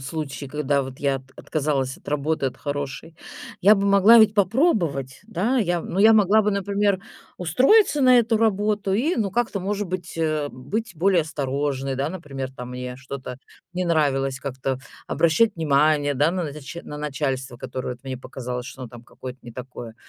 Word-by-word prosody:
случае, 140 -1 -5
когда 145 -1 0
вот 130 0 -8
я 140 -1 +1
от 135 - -9
отказалась 140 -4 -1
от - - -15
работы, 150 0 0
от 130 - -4
хорошей, 145 +2 -5 0.5
я 205 +4 +7
бы 200 0 0
могла 200 +4 +7
ведь 220 -1 +6
попробовать, 185 - +1
да. 220 +6 0
Я 175 -5 +1
ну, 190 - -3
я 220 +2 +7
могла 215 0 +5
бы, 210 - +1
например, 200 0 0 0.4
устроиться 275 - +4
на 255 -2 +6
эту 225 -1 +2
работу 210 -2 +1
и, 275 - +1
ну, 205 -4 -1
как-то, 225 -3 -1
может 205 +1 -2
быть, 175 -1 -5
э, 155 -2 0
быть 200 - -4
более 180 +1 +3
осторожной. 140 -2 -2
Да, 135 +3 -1
например, 140 -7 -6
там, 125 -1 -8
мне 125 0 -6
что-то 130 -2 -7 0.3
не 180 0 -2
нравилось, 135 -5 +1
как-то 130 -1 -3 0.3
обращать 200 +7 +3
внимание, 150 -2 +2
да, 150 +6 +2
на 185 -1 -1
нач 145 +1 -8
на 150 - -8
начальство, 135 -4 -3
которое 130 +1 -5
вот 125 -1 -8
мне 130 -1 -5
показалось, 125 -1 -6
что 130 - -9
оно 125 - -6
там 120 +1 -13
какое-то 130 +1 -9
не 120 - -10
такое. 125 -2 -8
150 Hz, 180 wpm, -23 LUFS, 135-200 Hz, 0.5 s, я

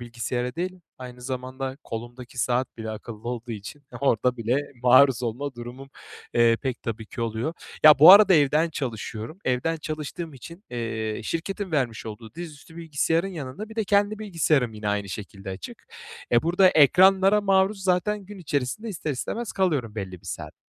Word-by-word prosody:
bilgisayara 120 +1 -3
değil 180 +2 -4 0.2
aynı 125 -1 -9
zamanda 130 +1 -5
kolumdaki 120 +2 -8
saat 125 +1 0
bile 110 -1 -5
akıllı 110 +1 -8
olduğu 120 -1 -5
için 110 +7 -9 0.2
orada 125 -2 +2
bile 120 +5 0 0.2
maruz 130 0 +6
olma 130 +4 -3
durumum, 120 +3 -9 0.4
eee, 115 -1 +5
pek 130 -3 -3
tabii 110 -1 -5
ki 120 - -8
oluyor. 115 +7 -2 0.3
Ya, 150 -1 +9
bu 160 +6 +11
arada 200 -2 +8
evden 155 +2 +3
çalışıyorum. 120 - -5
Evden 130 +6 0
çalıştığım 155 +1 -6
için, 170 - -12
eee, 115 -2 -3
şirketin 190 +2 -4
vermiş 125 -7 -1
olduğu 110 +3 -9
dizüstü 160 -1 -10
bilgisayarın 165 +2 0
yanında 170 +3 -7
bir 220 - -12
de 220 - 0
kendi 205 +1 +2
bilgisayarım 160 - +1
yine 105 -1 -4
aynı 105 -1 -1
şekilde 95 0 -7
açık. 95 -1 -9 0.4
Eee, 120 -1 +4
burada 180 +3 +4
ekranlara 190 +6 +5
maruz 195 0 +2
zaten 190 +3 +1
gün 205 0 -10
içerisinde 145 - -3
ister 165 -6 -4
istemez 215 - -4
kalıyorum 145 - 0
belli 95 -4 -6
bir - - -17
saat. - - -6
135 Hz, 160 wpm, -25 LUFS, 120-175 Hz, 0.4 s, bu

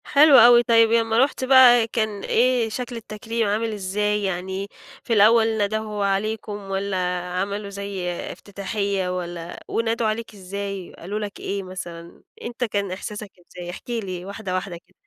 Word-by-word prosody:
حلو 290 -1 +6
أوي، 240 0 +8
طيب 230 -1 +4
يمّا 225 -1 +2
رُحت 270 -1 -2
بقى 255 -3 +7
كان 215 -3 -2
إيه 245 -1 +2
شكل 245 +2 -5
التكريم 225 0 -3
عامل 220 +2 -1
إزاي؟ 210 +1 -1
يعني 190 +1 -3 0.4
في 235 - -1
الأول 220 +1 +5
ندهوا 210 0 -1
عليكم 210 +2 -1 0.2
والّا 195 0 -1 0.4
عملوا 200 +1 -4
زي 200 -2 -4 0.2
إفتتاحية، 200 -1 -3
والّا 170 -1 -7
ونادوا 230 0 0
عليك 220 +1 -3
إزاي، 195 -1 -6
قالوا 200 +5 -5
لك 205 -1 -6
إيه 200 0 -3
مثلًا؟ 175 -2 -9 0.2
أنت 240 +1 -5
كان 200 -4 -1
إحساسك 205 +2 -6
إزاي؟ 175 0 -10
احكِ 180 - -9
لي 190 -7 -4
واحدة، 200 -1 -5
واحدة 185 -2 -4
كده. - - -30
210 Hz, 150 wpm, -23 LUFS, 195-225 Hz, 0.4 s, أوي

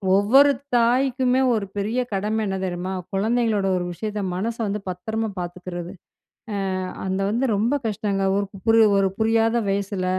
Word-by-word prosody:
ஒவ்வொரு 265 +9 +6 0.2
தாய்க்குமே 255 +2 +2
ஒரு 215 -3 -1
பெரிய 215 +5 -1
கடமை 210 +3 -1
என்ன 190 - -2
தெரியுமா? 185 +1 -3 0.2
குழந்தைங்களோட 215 0 +1
ஒரு 180 - -2
விஷயத்த 210 +3 -4
மனச 225 +5 -2
வந்து 205 +1 -2
பத்திரமா 220 +5 -3
பார்த்துக்கிறது. 175 0 -6 0.8
அ - - -1 0.3
அது 190 +1 -1
வந்து 235 +5 0
ரொம்ப 230 +7 +1
கஷ்டங்க. 200 -2 -1
ஒரு 200 0 0 0.2
புரி 225 0 +5 0.2
ஒரு 195 -1 +2
புரியாத 225 +1 +2
வயசுல, 195 -1 -1
210 Hz, 140 wpm, -23 LUFS, 195-225 Hz, 0.8 s, ஒவ்வொரு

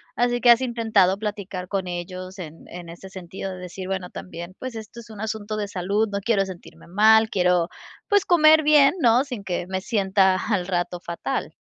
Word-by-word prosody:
así 245 0 +1
que, 240 0 +6
¿has 235 +2 +5
intentado 220 -6 +2
platicar 200 -4 -5
con 190 -2 -3
ellos?, 185 +2 -6
en 165 -2 -9
en 175 -1 -9
ese 175 +3 -11
sentido 190 +1 -7
de 185 - -8
decir: 180 +1 -8
"Bueno, 190 -2 -3
también, 175 +1 -9
pues, 255 -2 -7
esto 220 +1 -9
es 230 - -17
un 215 -2 -11
asunto 215 0 -4
de 205 -1 -2
salud, 200 +3 -1
no 200 -1 -3
quiero 200 -2 +1
sentirme 185 -3 -12
mal, 220 +4 +5
quiero 180 -3 +2 0.4
pues 405 -2 +3
comer 315 -3 +6
bien, 295 -1 +5
¿no?, 245 +1 +4
sin 245 -8 -7
que 180 -1 -3
me 190 0 -3
sienta 195 -4 +2
al 200 -3 -1
rato 175 -1 -2
fatal". 175 +11 -4
195 Hz, 195 wpm, -23 LUFS, 180-225 Hz, 0.4 s, que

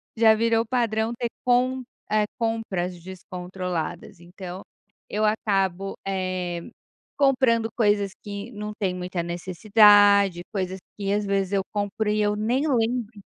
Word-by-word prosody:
Já 220 -1 +6
virou 225 0 +2
padrão 225 -2 0
ter 240 0 -2
com 255 +1 +2 0.3
eh, 215 0 +3
compras 200 -7 -2
descontroladas. 180 -2 -6
Então 180 +1 -9 0.5
eu 215 +1 0
acabo, 195 -3 0
eh, 185 -2 -3 0.5
comprando 255 -5 +3
coisas 205 -3 +2
que 205 +3 -6
não 210 -1 -6
tem 190 -3 0
muita 180 -1 -3
necessidade, 200 +1 +4
coisas 190 -1 -3 0.2
que 200 -1 -2
às 205 0 0
vezes 195 -1 0
eu 195 -1 +2
compro 210 +1 -1
e 210 0 +1
eu 210 0 +1
nem 240 +8 0
lembro. 235 -4 -1
205 Hz, 130 wpm, -25 LUFS, 185-225 Hz, 0.5 s, Já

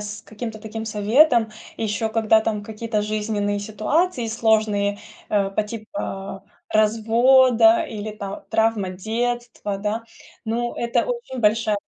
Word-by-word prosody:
с 210 +1 -7
каким-то 220 0 -7
таким 220 +1 -6
советом, 225 +3 +3 0.3
и 225 - -3
еще 220 +1 -1
когда 220 0 +3
там 215 -2 -2
какие-то 220 0 -3
жизненные 210 -1 -1
ситуации 235 - 0
сложные, 215 -2 +1 0.3
э, 200 -2 +1
по 210 +2 0
типа 200 -3 -6 0.3
развода 240 +8 +4
или, 215 -5 -6
там, 200 -2 -7
травма 220 -4 +1
детства, 225 +1 -3
да. 210 +3 -2 0.4
Ну, 235 +2 -2
это 235 0 0
очень 475 - -5
большая 215 0 +2
220 Hz, 125 wpm, -22 LUFS, 210-230 Hz, 0.4 s, развода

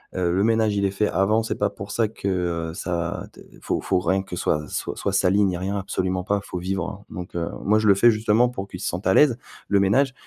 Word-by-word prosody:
Heu, 90 -2 +1
le 95 +3 +1
ménage, 110 -2 +2
il 100 - +1
est 95 - +1
fait 105 +1 0
avant, 105 +4 +2
c'est 115 - -2
pas 105 - 0
pour 100 +1 -9
ça 115 +1 +1
que, 105 -2 -4
heu, 85 -3 -2
ça, 85 -1 -3
d - - -14 0.2
faut - - -1
faut 95 - +1
rien 95 +1 0
que 90 - -7
soit 75 -3 0
soit 100 - -3
sali, 100 +1 +3
ni 95 -3 +1
rien 95 +3 -2
absolument 95 -1 -2
pas, 100 +2 0
faut 90 -2 -6
vivre, 95 +3 -4
heu. - - -9
Donc 90 -1 -7
heu, 85 -1 -2 0.2
moi, 105 +2 +4
je 110 - +1
le - - +8
fais 110 +5 +6
justement 110 +2 +3
pour 100 -5 -6
qu'ils 90 - -8
se - - -3
sentent 90 +4 -3
à 95 - +4
l'aise, 135 -2 +5 0.3
le 100 - +3
ménage, 130 +8 +3
95 Hz, 255 wpm, -23 LUFS, 90-105 Hz, 0.3 s, le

